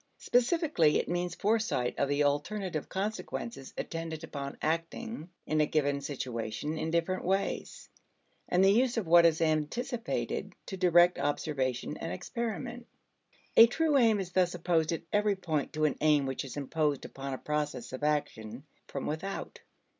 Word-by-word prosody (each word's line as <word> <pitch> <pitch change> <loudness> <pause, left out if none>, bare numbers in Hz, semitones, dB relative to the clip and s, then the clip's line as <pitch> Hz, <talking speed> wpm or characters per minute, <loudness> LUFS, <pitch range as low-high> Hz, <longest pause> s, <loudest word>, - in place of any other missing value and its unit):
Specifically 245 - +2
it - - -1
means 175 0 -2
foresight 215 - +1
of 140 - +1
the 145 +1 +2
alternative 155 +4 -1
consequences 205 - -4
attendant 165 -1 -4
upon 140 -3 -6
acting 165 +4 -3 0.2
in 155 0 +1
a 150 - +3
given 145 -2 +1
situation 130 0 -4
in 160 - -2
different 170 +3 0
ways, 195 +2 -2 0.6
and 180 +1 +4
the 195 - +6
use 245 +3 +2
of 225 - 0
what 170 +1 +7
is 160 0 0
anticipated 225 - -2
to 190 - -5
direct 175 -1 +5
observation 140 -2 -1
and 165 - -5
experiment. 235 +4 -4 0.7
A 230 - +10
true 310 +5 +1
aim 225 -6 +5
is 185 -2 -4
thus 180 -1 +2
opposed 165 -2 +1
at 165 - -3
every 205 -1 +3
point 160 -7 -2
to 155 0 +1
an 150 - 0
aim 150 -2 +4
which 135 -1 -3
is 135 - -8
imposed 145 0 -1
upon 135 0 -5
a - - -7
process 150 -5 -3
of 130 - -5
action 135 -5 -2 0.2
from 140 - -5
without. 185 +6 -4
165 Hz, 155 wpm, -30 LUFS, 145-195 Hz, 0.7 s, A